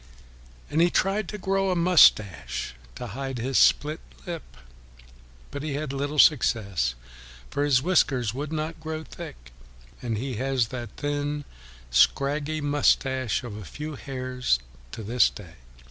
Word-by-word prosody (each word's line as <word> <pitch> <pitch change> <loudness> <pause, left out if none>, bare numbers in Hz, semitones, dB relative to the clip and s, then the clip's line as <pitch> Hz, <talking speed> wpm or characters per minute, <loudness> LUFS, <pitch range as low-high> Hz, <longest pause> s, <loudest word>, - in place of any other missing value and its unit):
And 155 +3 +2
he 175 - +5
tried 195 +2 +1
to 210 - -5
grow 195 0 0
a 185 - +1
moustache 160 - +4 0.2
to 125 - -6
hide 135 +1 -5
his 130 +3 +1
split 150 +2 +3 0.3
lip; 170 - -7 0.9
but 140 - -5
he 150 -1 -3
had 145 -2 -3
little 145 +2 -3
success, 100 - +3 0.6
for 140 - 0
his 135 -3 +3
whiskers 130 - +2
would 145 +4 -4
not 160 +1 -3
grow 160 0 -5
thick, - - -10 0.5
and 115 -3 -2
he 125 0 -3
has 130 -2 0
the 120 -3 -5
thin 145 0 -2 0.5
scraggy 145 - +2
moustache 130 -4 +1
of 120 -4 -7
a 105 - -7
few 150 - -7
hairs 130 - -1 0.3
to 110 - -7
this 120 +4 +4
day. 90 -5 -12
140 Hz, 145 wpm, -26 LUFS, 120-155 Hz, 0.9 s, he